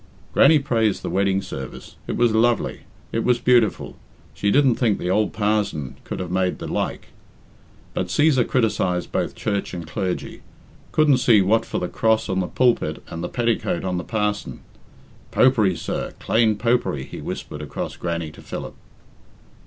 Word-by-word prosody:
Grannie 155 +3 +6
praised 115 -7 0
the - - -3
wedding 95 0 +1
service 65 -4 -8
it - - -2
was 120 -2 +3
lovely 115 0 +1 0.3
it 115 - -1
was 125 -1 +3
beautiful 120 -3 +2 0.4
she 100 - 0
didn't 135 +2 +4
think 115 -3 +1
the 90 - -2
ould 105 +2 +2
parzon 105 - -1
could - - -5
have 90 -2 -4
made 95 0 0
the - - -6
like; - - -3 0.8
but - - -2
Cæsar 145 -5 +3
criticised 100 -7 0
both - - -1
church 100 -3 -2
and 85 -2 -6
clergy 90 +4 -4 0.5
couldn't 150 -4 +4
see 115 -4 +5
what 110 +4 +2
for - - -3
the 90 - -1
cross 110 +2 +1
on 95 -1 0
the 90 - -1
pulpit 125 +3 +1
and 85 +1 -6
the 85 - -3
petticoat 115 -7 0
on 90 -1 -1
the - - -5
parson. 105 -2 -2 0.7
"Popery, 110 -8 +3
sir, - - -4
clane 110 -1 +2
Popery," 115 - 0
he - - -8
whispered 75 - -6
across 75 - -5
Grannie 85 -2 -3
to - - -14
Philip. - - -6
105 Hz, 165 wpm, -22 LUFS, 90-120 Hz, 0.8 s, Grannie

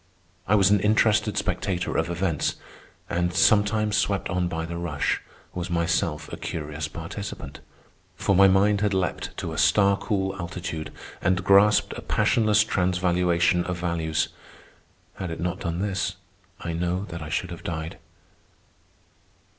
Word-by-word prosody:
I 105 - +4
was 100 -1 +4
an 105 - +5
interested 105 0 +2
spectator 90 -3 -1
of 80 +1 0
events, 85 -3 -1 0.5
and, 85 0 0
sometimes 105 +1 +3
swept 100 -3 0
on 90 -1 0
by 80 -1 -3
the 85 +1 -5
rush, 75 -4 -1 0.3
was 90 0 -4
myself 85 -2 0
a - - -4
curious 75 -1 -4
participant. 80 -3 -7 0.6
For 100 - +1
my 100 +1 +7
mind 100 +2 +3
had 105 -2 +1
leaped 95 -2 -2
to - - -4
a - - -3
star 100 -1 +4
cool 95 -1 -1
altitude 85 -2 -5 0.3
and 90 0 +1
grasped 100 +2 +5
a - - -7
passionless 110 -2 +3
transvaluation 90 -2 +1
of 90 -1 -3
values. 85 -3 -1 0.9
Had 95 - -4
it 80 - -5
not 90 +2 -2
done 85 +1 -3
this, 100 -1 -1 0.4
I 85 - -4
know 90 +3 -1
that 85 -1 -6
I 75 - -6
should 90 +3 -2
have 85 - -8
died. 80 -1 -5
90 Hz, 145 wpm, -25 LUFS, 85-100 Hz, 0.9 s, my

